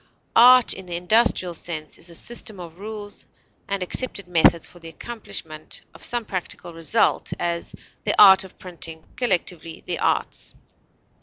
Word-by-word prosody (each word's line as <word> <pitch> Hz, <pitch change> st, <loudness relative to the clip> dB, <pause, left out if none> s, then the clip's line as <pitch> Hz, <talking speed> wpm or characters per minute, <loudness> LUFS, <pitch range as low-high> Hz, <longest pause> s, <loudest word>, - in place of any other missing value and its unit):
Art 250 Hz, +1 st, +8 dB
in 190 Hz, -1 st, -10 dB
the 175 Hz, -, -4 dB
industrial 180 Hz, 0 st, +2 dB
sense 155 Hz, -2 st, -6 dB
is 170 Hz, -, -8 dB
a 170 Hz, -, -11 dB
system 220 Hz, 0 st, -5 dB
of 170 Hz, 0 st, -10 dB
rules 210 Hz, 0 st, -8 dB, 0.4 s
and 200 Hz, -2 st, -1 dB
accepted 200 Hz, 0 st, -3 dB
methods 170 Hz, -1 st, +4 dB
for 175 Hz, -, -16 dB
the 165 Hz, -1 st, -9 dB
accomplishment 160 Hz, -6 st, -7 dB
of -, -, -13 dB
some 240 Hz, -2 st, -1 dB
practical 180 Hz, -3 st, -6 dB
result; 165 Hz, +7 st, +1 dB
as, 170 Hz, -1 st, -3 dB, 0.3 s
the -, -, +1 dB
art 190 Hz, -1 st, +9 dB
of 190 Hz, -, -14 dB
printing; 165 Hz, -3 st, -5 dB
collectively, 180 Hz, -7 st, -1 dB
the -, -, -2 dB
arts. -, -, -1 dB
180 Hz, 150 wpm, -23 LUFS, 170-210 Hz, 0.4 s, art